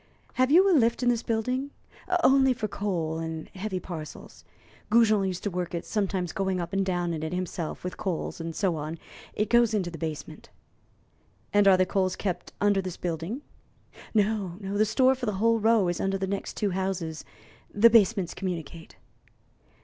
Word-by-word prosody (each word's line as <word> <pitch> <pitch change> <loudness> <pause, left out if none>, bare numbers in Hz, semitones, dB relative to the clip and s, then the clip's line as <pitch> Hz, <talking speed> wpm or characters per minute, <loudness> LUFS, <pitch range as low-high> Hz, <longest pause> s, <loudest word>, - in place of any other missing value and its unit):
"Have 255 0 +2
you 360 +6 +6
a 385 - +4
lift 235 -4 +3
in 245 - +4
this 235 -2 +1
building?" 250 +5 -1 0.5
"Only 265 -1 +5
for 225 -3 -3
coals 170 -6 -2
and 160 -1 -5
heavy 190 -1 -4
parcels. 160 -5 -9 0.5
Goujon 215 -3 +4
used 185 -1 -4
to 205 - -1
work 180 -1 -3
it, 170 - -4
sometimes 190 -5 -1
going 190 -1 -1
up 175 +1 -5
and 195 0 +2
down 175 -2 -1
in 155 - -4
it 160 +2 -3
himself 180 -3 -4
with 180 - -5
coals, 185 -4 -3
and 165 0 -5
so 185 -5 0
on; 155 +2 -5 0.4
it 210 - 0
goes 235 -1 +4
into 180 -4 -1
the 165 - -8
basement." 155 -2 -6 1.0
"And 205 -1 +5
are 190 -1 +7
the 185 - +3
coals 185 0 0
kept 185 -4 -4
under 205 -1 +3
this 185 -2 -6
building?" 175 - -4 0.7
"No. 205 -4 0
The 205 +1 0
store 255 +5 +4
for 255 -2 -5
the 210 - 0
whole 230 +2 +3
row 220 -3 +3
is 175 -1 -1
under 195 0 0
the 190 - -2
next 195 +1 -4
two 205 -2 0
houses 180 -4 -3 0.5
the 230 +3 +6
basements 205 -5 +3
communicate." 170 -3 -6
195 Hz, 180 wpm, -27 LUFS, 175-220 Hz, 1.0 s, are